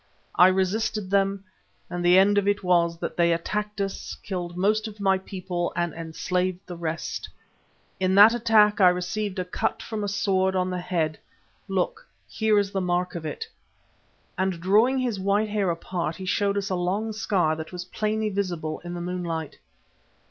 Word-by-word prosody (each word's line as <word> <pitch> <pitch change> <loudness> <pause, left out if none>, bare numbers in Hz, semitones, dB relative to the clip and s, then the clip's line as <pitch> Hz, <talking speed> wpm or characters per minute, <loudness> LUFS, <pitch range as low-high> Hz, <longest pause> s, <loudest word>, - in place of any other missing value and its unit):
I 180 - +7
resisted 190 +1 0
them, 195 0 +1 0.4
and 175 0 -4
the 175 +1 +6
end 205 +2 +5
of 200 - -2
it 205 0 +1
was 170 -2 +2
that - - -4
they 170 -1 +4
attacked 210 +5 -2
us, 195 -1 -3
killed 175 -2 -4
most 215 +4 +1
of 215 -1 -10
my 195 -1 +2
people 180 -2 -4
and 175 -2 -1
enslaved 180 +3 -2
the 180 - -7
rest. 165 -1 -4 0.7
In 190 0 +2
that 210 +3 +9
attack 215 -3 +4
I 180 - +8
received 185 +3 -2
a 185 - -2
cut 180 - -2
from 220 -2 -4
a - - -1
sword 190 -1 +1
on 185 0 0
the 180 - -2
head 170 -4 -1 0.5
look, 190 -2 -2 0.2
here 220 - +1
is 200 -1 +1
the 195 - -1
mark 180 0 0
of 165 -2 -5
it," 150 - -5 0.9
and 190 -2 0
drawing 215 +9 +3
his 245 -6 -1
white 200 +3 +1
hair 205 -3 0
apart 170 -1 -3
he 190 - -7
showed 200 +2 +1
us 200 0 -2
a - - +1
long 195 +5 -1
scar 190 -7 +1
that 160 0 -7
was 180 0 -6
plainly 215 +2 -1
visible 175 -6 -3
in 175 0 -6
the 175 - -5
moonlight. 170 -3 -4
185 Hz, 180 wpm, -25 LUFS, 175-205 Hz, 0.9 s, that